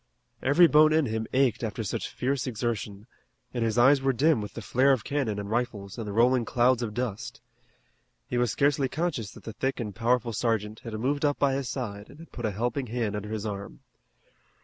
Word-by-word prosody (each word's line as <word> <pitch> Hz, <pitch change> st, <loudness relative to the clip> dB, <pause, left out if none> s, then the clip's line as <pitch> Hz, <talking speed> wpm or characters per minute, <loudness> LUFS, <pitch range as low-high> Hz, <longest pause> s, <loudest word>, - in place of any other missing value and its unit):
Every 145 Hz, +7 st, +6 dB
bone 155 Hz, -1 st, +6 dB
in 160 Hz, -1 st, +3 dB
him 110 Hz, -1 st, -2 dB
ached 130 Hz, -3 st, +2 dB
after 110 Hz, 0 st, -3 dB
such 100 Hz, -, -3 dB
fierce 135 Hz, +1 st, -2 dB
exertion, 105 Hz, -3 st, -3 dB, 0.5 s
and 120 Hz, -2 st, -1 dB
his 115 Hz, 0 st, 0 dB
eyes 135 Hz, +3 st, +6 dB
were 135 Hz, 0 st, +2 dB
dim 145 Hz, 0 st, +3 dB
with 105 Hz, -, -7 dB
the 115 Hz, -, -5 dB
flare 130 Hz, +6 st, +3 dB
of 130 Hz, -, -1 dB
cannon 135 Hz, -8 st, -1 dB
and 100 Hz, -1 st, -4 dB
rifles 110 Hz, -3 st, -3 dB
and 110 Hz, -, -4 dB
the -, -, -3 dB
rolling 120 Hz, +3 st, +3 dB
clouds 125 Hz, +1 st, +2 dB
of 110 Hz, -3 st, -4 dB
dust. 120 Hz, -4 st, -4 dB, 0.9 s
He 120 Hz, -, -1 dB
was 120 Hz, -1 st, +2 dB
scarcely 140 Hz, -1 st, +2 dB
conscious 145 Hz, -, -2 dB
that -, -, -14 dB
the 110 Hz, -, -7 dB
thick 130 Hz, +5 st, -2 dB
and 105 Hz, -4 st, -4 dB
powerful 115 Hz, +1 st, +1 dB
sergeant 110 Hz, -1 st, -1 dB
had 115 Hz, -, -8 dB
moved 140 Hz, +7 st, -1 dB
up 145 Hz, -1 st, +2 dB
by 140 Hz, -1 st, +2 dB
his 135 Hz, -2 st, -2 dB
side 105 Hz, -7 st, -5 dB
and -, -, -14 dB
had 165 Hz, +1 st, -13 dB
put 120 Hz, -, -5 dB
a -, -, -2 dB
helping 120 Hz, +6 st, -2 dB
hand 115 Hz, -2 st, -2 dB
under 105 Hz, 0 st, -5 dB
his 110 Hz, -1 st, -4 dB
arm. 100 Hz, -1 st, -6 dB
120 Hz, 215 wpm, -27 LUFS, 110-135 Hz, 0.9 s, Every